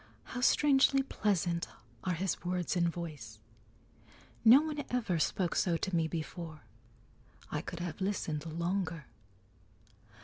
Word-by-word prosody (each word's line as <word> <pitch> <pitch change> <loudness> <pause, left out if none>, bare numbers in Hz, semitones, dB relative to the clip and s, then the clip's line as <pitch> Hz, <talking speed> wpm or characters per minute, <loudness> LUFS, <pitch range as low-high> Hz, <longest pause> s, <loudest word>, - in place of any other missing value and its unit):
"How 250 - -6
strangely 275 0 +4
pleasant 180 -9 0 0.4
are 185 - 0
his 185 +3 -2
words 180 0 -1
and 170 -1 +3
voice! 150 -11 -7 1.1
No 240 +5 +9
one 300 -2 -3
ever 220 -9 0
spoke 175 +2 +1
so 175 -5 +2
to 190 +1 -2
me 165 -1 +2
before. 160 -1 -6 0.9
I 150 - -1
could 175 0 -6
have 175 0 -5
listened 170 -5 -2
longer." 170 -1 -2
175 Hz, 125 wpm, -32 LUFS, 165-205 Hz, 1.1 s, No